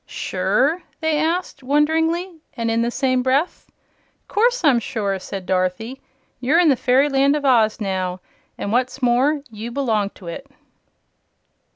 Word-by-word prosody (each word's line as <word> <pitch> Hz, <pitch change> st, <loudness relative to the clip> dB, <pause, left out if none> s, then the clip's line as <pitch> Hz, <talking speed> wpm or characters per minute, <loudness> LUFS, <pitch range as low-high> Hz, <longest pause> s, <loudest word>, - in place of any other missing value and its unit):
"Sure?" 310 Hz, +7 st, 0 dB, 0.2 s
they 315 Hz, -2 st, 0 dB
asked, 325 Hz, -1 st, -1 dB
wonderingly, 320 Hz, +5 st, 0 dB, 0.2 s
and 230 Hz, -1 st, -1 dB
in 230 Hz, 0 st, +1 dB
the 235 Hz, -, +1 dB
same 255 Hz, 0 st, 0 dB
breath. 270 Hz, +7 st, 0 dB, 0.6 s
"Course 485 Hz, +2 st, +1 dB
I'm 275 Hz, -6 st, +5 dB
sure," 200 Hz, -4 st, -2 dB
said 190 Hz, 0 st, -7 dB
Dorothy. 185 Hz, +8 st, -2 dB, 0.4 s
"You're 265 Hz, +6 st, +2 dB
in 345 Hz, -3 st, +5 dB
the 275 Hz, -, +4 dB
Fairyland 275 Hz, +3 st, +3 dB
of 295 Hz, -1 st, -3 dB
Oz, 230 Hz, -5 st, +3 dB
now; 185 Hz, -3 st, -2 dB, 0.4 s
an' 200 Hz, -, -4 dB
what's 255 Hz, +2 st, -1 dB
more, 265 Hz, +5 st, +2 dB
you 220 Hz, +2 st, -6 dB
belong 225 Hz, -6 st, 0 dB
to 190 Hz, -, -14 dB
it!" 170 Hz, +12 st, -7 dB
260 Hz, 145 wpm, -21 LUFS, 225-300 Hz, 0.6 s, I'm